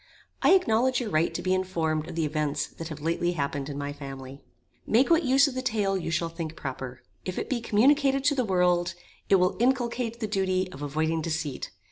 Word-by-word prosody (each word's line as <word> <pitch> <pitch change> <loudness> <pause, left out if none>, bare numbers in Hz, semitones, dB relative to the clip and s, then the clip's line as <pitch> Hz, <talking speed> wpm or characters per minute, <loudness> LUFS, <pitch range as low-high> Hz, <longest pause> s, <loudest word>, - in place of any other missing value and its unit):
I - - +6
acknowledge 255 -8 +2
your 230 -5 -3
right 155 +2 +2
to - - -5
be 185 - +2
informed 165 -4 -1
of 175 - -7
the 165 -2 0
events 150 -1 -1
that 165 - -8
have 155 -2 -8
lately 170 +2 0
happened 140 -2 -2
in 140 - -5
my 145 0 -3
family. 135 -1 -9 0.5
Make 255 +8 +3
what 335 0 +6
use 275 0 +4
of 280 - -4
the 255 - -2
tale 210 -6 0
you 180 -3 -2
shall 170 +1 0
think 165 -1 -6
proper. 130 -3 -6 0.2
If 185 - -5
it - - -3
be 245 -3 0
communicated 270 +5 +3
to 290 +1 +4
the 260 -3 +1
world, 180 -3 +2 0.3
it 195 - +6
will 180 -1 +3
inculcate 240 -2 0
the 225 - -1
duty 190 -2 0
of 145 - -10
avoiding 160 +3 -1
deceit. 155 -4 -3
180 Hz, 210 wpm, -27 LUFS, 155-235 Hz, 0.5 s, I